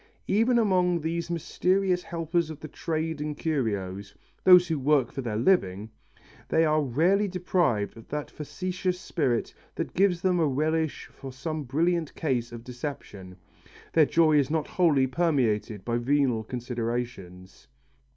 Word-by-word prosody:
Even 230 +5 +2
among 180 -5 +2
these 165 +2 -3
mysterious 180 +2 0
helpers 170 -1 -2
of 155 -2 -8
the 155 - -8
trade 160 -1 -3
in 150 0 -3
curios 100 - -3 0.3
those 180 -1 +7
who 160 -3 -1
work 140 -2 +2
for 135 - -4
their 115 -4 -3
living 110 - +1 0.6
they 165 - +3
are 155 0 +2
rarely 170 - +2
deprived 175 - 0
of 115 - -13
that 150 0 -5
facetious 180 +5 -3
spirit 135 -11 -1 0.2
that - - -4
gives 185 -2 +2
them 180 -1 +2
a 160 - +3
relish 155 +3 -1
for 135 - -9
some 155 +4 -4
brilliant 165 +4 0
case 125 -6 -1
of 115 -1 -9
deception. 120 -8 -7 0.6
Their 155 -3 +5
joy 155 -3 +4
is 135 - 0
not 155 -1 0
wholly 155 -7 +3
permeated 125 - 0
by 120 0 0
venal 130 -3 +1
considerations. 120 -6 -5
150 Hz, 145 wpm, -27 LUFS, 120-170 Hz, 0.6 s, those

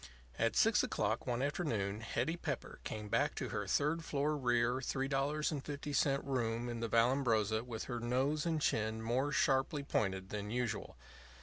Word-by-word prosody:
At - - +2
six - - +5
o'clock - - -1
one 125 +1 0
afternoon 110 - -1
Hetty 155 +8 -1
Pepper - - -4
came 105 -1 -5
back - - +1
to - - -3
her - - -3
third 160 +3 +1
floor 150 0 0
rear 120 -2 +2
$3.50 140 +1 0
room 120 -3 -1
in 120 -1 -4
the 115 0 -2
Vallambrosa 115 -3 +3
with 115 -2 -5
her 120 -2 -4
nose 130 +6 +1
and 165 -2 0
chin 110 -5 0
more 130 +5 +1
sharply 140 +1 +2
pointed 95 -7 -1
than 105 -1 -4
usual. 115 -3 -2
125 Hz, 150 wpm, -35 LUFS, 115-145 Hz, -, six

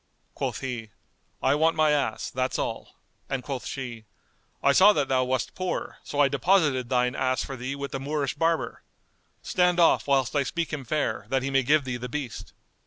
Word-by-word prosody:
Quoth - - -3
he, 120 -4 -4 0.5
"I - - +4
want 160 +3 +3
my 155 -1 +3
ass; 140 -7 -1
that's 130 +1 -1
all;" - - -4 0.3
and 135 -2 -2
quoth 135 -2 -5
she, 120 -5 -6 0.6
"I 140 - +5
saw 195 +8 +7
that 145 -7 0
thou 130 -1 +3
wast 130 -1 -1
poor: 185 -1 -4
so 145 - -5
I 145 - +6
deposited 145 -8 +2
thine 125 -1 +2
ass 130 0 0
for 135 - -6
thee 130 +2 -4
with 140 0 -5
the 135 - -3
Moorish 140 0 -2
barber. 165 0 0 0.6
Stand 180 -1 +2
off, 170 - +4
whilst 135 -1 +2
I 145 - +3
speak 165 +4 -3
him 140 -4 -4
fair, 150 +5 -1
that 135 -1 +1
he 135 - -2
may 135 0 +4
give 145 +3 +3
thee 125 -2 -3
the 125 +1 -6
beast." 140 -3 -5
135 Hz, 195 wpm, -26 LUFS, 130-150 Hz, 0.6 s, saw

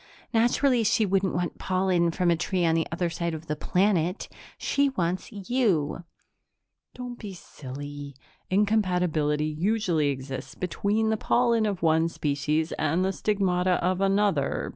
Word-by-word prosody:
Naturally 240 +2 +3
she 220 0 +2
wouldn't 195 -1 +1
want 175 -1 -2
pollen 185 -2 +1
from 175 +1 +1
a - - +3
tree 180 +2 -1
on 165 - +3
the 165 0 +1
other 170 +1 -1
side 170 0 -3
of 160 +1 -9
the 150 - -2
planet. 180 +2 0 0.3
She 280 0 +1
wants 180 -6 -2
you!" 195 - 0 0.9
"Don't 245 -1 -7
be 200 -4 -7
silly. 145 -2 -8 0.3
Incompatibility 180 -7 +1
usually 170 0 0
exists 135 -1 -5
between 205 +5 0
the 220 - +1
pollen 235 -1 +2
of 195 -4 -3
one 160 0 +3
species 150 +1 -1
and 165 +5 +1
the 190 - 0
stigmata 185 -3 +1
of 180 +1 0
another. 195 -7 +1
180 Hz, 140 wpm, -26 LUFS, 160-205 Hz, 0.9 s, Naturally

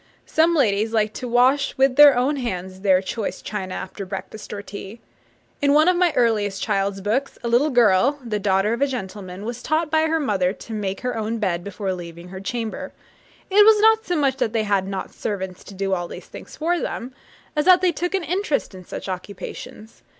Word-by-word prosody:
Some 330 +2 +3
ladies 220 -5 +2
liked 215 -1 +1
to 250 - -5
wash 255 +4 +3
with 265 -1 +3
their 290 -2 +8
own 275 +4 +1
hands 190 -7 -4
their 190 -1 +3
choice 215 +2 -4
china 190 -3 -5
after 190 +2 -6
breakfast 195 +3 -7
or 205 -1 -5
tea. 200 +2 -9 0.6
In 285 0 +4
one 310 +2 +5
of 365 - +4
my 350 -1 +3
earliest 210 -5 +1
child's 195 0 -1
books, 235 +8 -1
a - - -2
little 245 +6 +3
girl, 240 +2 +4
the 210 -3 -2
daughter 195 +2 +2
of 235 - -3
a 280 - +4
gentleman, 200 -5 -6
is 240 +1 -5
taught 310 +2 0
by 315 0 +3
her 325 0 +1
mother 195 -10 +1
to 225 - -10
make 200 -2 -3
her 250 -1 -2
own 225 +1 -2
bed 180 -5 -1
before 200 0 -3
leaving 170 0 -9
her 190 +1 -7
chamber. 225 +2 -4 0.6
It 415 +2 +7
was 430 0 +6
not 445 +1 +5
so 355 - -2
much 275 -4 +1
that 225 - -1
they 225 -1 +1
had 200 -2 +1
not 195 -1 -5
servants 190 -3 -4
to 200 - -11
do 195 0 -1
all 175 -2 -1
these - - -9
things - - -11
for 340 +2 0
them, 255 -3 -5 0.4
as 300 - +1
that 365 -1 +7
they 365 -1 +3
took 355 +3 -2
an 380 - -1
interest 330 - -1
in 185 -1 -10
such - - -7
occupations. 190 +3 -8
220 Hz, 210 wpm, -22 LUFS, 195-285 Hz, 0.6 s, their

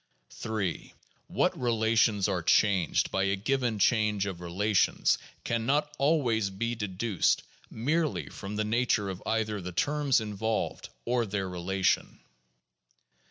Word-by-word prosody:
3. 105 -6 -4 0.3
What - - +1
relations 110 -3 +2
are 95 -3 -1
changed 95 0 +2
by 95 0 +1
a 95 0 +1
given 120 +2 0
change 105 -1 +2
of 95 -3 -5
relation 95 +4 +1 0.4
can 115 -1 -1
not 150 +2 +1
always 130 -8 +2
be 115 +5 -2
deduced 105 -2 0 0.3
merely 150 +7 -1
from 100 0 -7
the 105 0 0
nature 110 -3 +1
of 95 - -8
either 110 -2 -1
the 90 0 -6
terms 140 - +1
involved 110 +1 -3 0.2
or 120 -1 +1
their 95 -1 -2
relation. 95 +1 -1
105 Hz, 125 wpm, -29 LUFS, 95-120 Hz, 0.4 s, relations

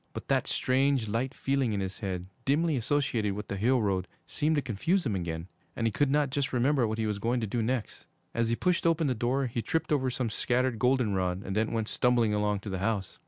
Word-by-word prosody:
But - - -7
that - - +2
strange, 130 -2 +2
light 115 +5 -1
feeling 135 -4 0
in 100 - -1
his 95 0 -4
head, 95 -4 -3 0.2
dimly 155 +4 +2
associated 120 -5 0
with 105 +1 -6
the - - -2
hill 120 +4 +2
road, 95 -2 0 0.2
seemed 155 +1 0
to 145 - +2
confuse 150 - 0
him 115 - 0
again 85 -2 -3 0.3
and 115 - -1
he 115 - +2
could 145 +6 +1
not 145 -1 +2
just 140 0 -1
remember 130 0 +2
what 110 0 -2
he 110 - 0
was 105 -2 -2
going 120 +4 0
to - - 0
do 115 +3 -1
next. 120 0 -3 0.3
As 115 -1 +1
he 115 - +2
pushed 180 +4 +1
open 165 -1 +2
the 135 - +2
door, 125 +4 0
he 120 -1 -2
tripped 160 +9 -1
over 130 -3 +1
some 125 -2 -2
scattered 125 +1 0
goldenrod, 100 -7 +1
and 95 - -4
then 110 +1 +1
went 110 -2 -1
stumbling 120 -3 +2
along 105 -1 0
to 105 - -6
the 95 - -2
house. 100 -2 -2
115 Hz, 235 wpm, -29 LUFS, 105-135 Hz, 0.3 s, that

